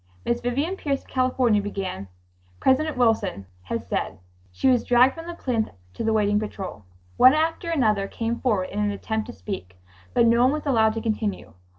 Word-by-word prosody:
Miss 235 0 0
Vivian 280 +10 -1
Pierce 280 -5 -2
of - - -25
California 255 -4 +2
began: 190 - -4 0.5
"President 300 +2 +2
Wilson 220 - +1 0.2
has 90 - -4
said.. - - -3 0.2
.' 90 +1 -33
She 90 - 0
was 250 -2 +4
dragged 245 +2 +5
from 330 0 -9
the 345 - -6
plinth 235 -8 -1 0.2
to - - -5
the 225 - +1
waiting 210 -1 +2
patrol. 195 - -6 0.3
One 260 +3 +7
after 325 +2 0
another 215 -11 +1
came 230 +3 -3
forward 205 -8 0
in 205 - -3
an 210 0 +1
attempt 220 +2 -3
to - - -7
speak, 90 -2 -7 0.4
but 235 - +5
no 235 +1 +4
one 255 +3 +4
was 305 0 -4
allowed 220 -6 +3
to 225 - -2
continue. 215 -2 -3
225 Hz, 195 wpm, -24 LUFS, 205-260 Hz, 0.5 s, One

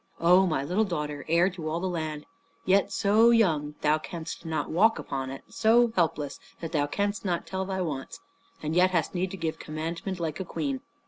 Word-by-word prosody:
"O 180 +3 +5
my 155 -5 0
little 180 +9 +1
daughter, 150 -7 -3
heir 170 +2 +4
to 165 -4 -5
all 165 +2 -1
the 190 - -2
land, 155 -4 -3 0.4
yet 195 +2 +3
so 215 +3 +4
young 160 -11 +2
thou 155 +1 +3
canst 165 +1 -7
not 160 -1 -2
walk 215 +8 +4
upon 135 -1 -4
it; 135 0 -7
so 230 +1 +3
helpless 155 -5 0 0.2
that 165 - -5
thou 145 -3 +1
canst 205 +5 -1
not 175 -4 -1
tell 190 0 -3
thy 190 -1 -2
wants 145 -6 -4 0.4
and 155 +1 -2
yet 180 +1 +5
hast 175 -3 0
need 185 +1 -1
to 195 - -7
give 165 -2 -3
commandment 165 +4 -4
like 160 -2 -3
a - - -1
queen! 145 -7 -3
170 Hz, 200 wpm, -27 LUFS, 155-190 Hz, 0.4 s, O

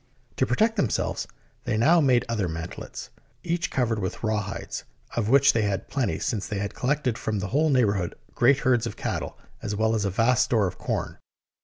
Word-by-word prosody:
To - - +2
protect 225 +1 +2
themselves, 130 - 0 0.4
they 110 - 0
now 160 +9 +5
made 130 -4 +3
other 110 -5 -1
mantelets, 85 +1 -7 0.3
each 170 0 -1
covered 115 -4 0
with 95 +2 -4
rawhides, 105 -3 -3 0.3
of 110 -2 0
which 140 +2 +6
they 115 - +2
had 100 -2 -2
plenty, 135 -4 0
since 105 -5 -2
they 105 - -3
had 100 +1 -3
collected 130 -2 0
from 110 -1 -2
the 100 0 -3
whole 155 +4 +2
neighbourhood 105 -9 +1 0.2
great 130 +3 +4
herds 125 -3 +2
of - - -7
cattle, - - -3 0.2
as 105 - -3
well 110 +2 +2
as 110 -2 0
a 100 - +1
vast 120 +6 +3
store 110 -5 +2
of 90 0 -4
corn. - - -3
115 Hz, 190 wpm, -26 LUFS, 100-130 Hz, 0.4 s, which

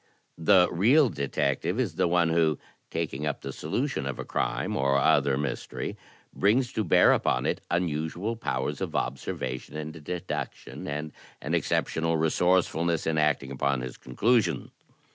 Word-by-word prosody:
The 90 +2 +5
real 125 - +4
detective 70 - -1
is 110 -10 0
the 80 - +1
one 85 -1 +3
who, 80 -2 +2 0.3
taking 75 -3 -3
up 75 - -3
the - - -6
solution - - -2
of - - -4
a - - -5
crime - - -1
or 70 +1 +2
other 70 0 +3
mystery, 70 -3 -4 0.4
brings 120 +6 +2
to 110 - 0
bear 85 - +5
upon - - +1
it - - -1
imusual 85 +5 -1
powers 70 - -2
of - - -3
observation 65 +1 -3
and 75 0 -5
deduction 85 +2 -5
and 75 +1 -4 0.3
an - - -4
exceptional 80 0 +1
resourcefulness 85 0 +2
in 80 -1 +1
acting 70 -3 +1
upon 70 -1 0
his 65 -1 -6
conclusions. 110 - +1
80 Hz, 145 wpm, -27 LUFS, 70-90 Hz, 0.4 s, The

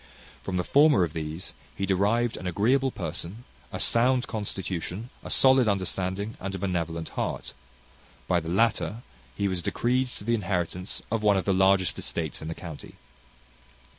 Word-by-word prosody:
From 95 -1 -3
the 90 - +1
former 145 - +5
of 80 -3 -2
these, 80 +1 -4 0.2
he 100 - -1
derived 105 +5 +2
an 90 - -5
agreeable 125 +9 +2
person, 90 +2 -4 0.3
a - - -4
sound 125 +2 +3
constitution, 100 0 -4
a - - -7
solid 130 -2 +5
understanding, 95 +1 -1
and 95 0 -4
a - - -3
benevolent 85 -4 -2
heart; - - -3 0.7
by 90 -2 +3
the 80 0 -6
latter, 115 +3 +1 0.3
he 100 - 0
was 95 -2 -1
decreed 125 +8 +1
to 125 - -8
the 115 +3 +1
inheritance 90 -3 -1
of 115 -1 +1
one 105 -2 +4
of 95 - -1
the 100 - +3
largest 95 0 +3
estates 80 -2 -2
in 80 - -6
the 80 - -4
county. 80 -4 -9
95 Hz, 165 wpm, -27 LUFS, 90-115 Hz, 0.7 s, former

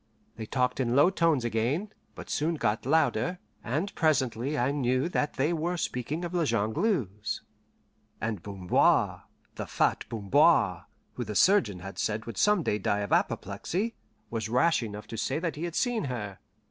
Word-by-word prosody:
They 110 -1 -7
talked 125 +1 0
in 125 -2 +1
low 145 +7 +6
tones 165 -9 +2
again, 125 - -1 0.2
but - - -9
soon 160 +3 0
got 110 -4 -1
louder, 160 +4 +2 0.3
and 155 - -2
presently 140 -3 +1
I 125 +2 +1
knew 130 0 +1
that 150 -4 -1
they 145 +5 +1
were 170 +2 -1
speaking 150 +4 -3
of 175 - -6
La 175 -2 +2
Jongleuse; 115 - -1 0.8
and 110 -2 -3
Bamboir 95 -3 +1 0.3
the - - -4
fat - - +1
Bamboir, 115 - +3 0.3
who 125 - -4
the 105 -2 -6
surgeon 110 - +3
had 95 +1 -8
said 110 +1 -1
would 115 -4 -6
some 210 -4 +4
day 105 - 0
die 100 +1 0
of 100 - -2
apoplexy 180 - -1 0.4
was 110 -1 -3
rash 130 +8 +3
enough 105 -2 -6
to 115 - -7
say 130 +5 -1
that 165 0 -2
he 155 +4 -4
had 170 - -5
seen 245 - 0
her. 105 -7 -5
130 Hz, 170 wpm, -28 LUFS, 110-165 Hz, 0.8 s, low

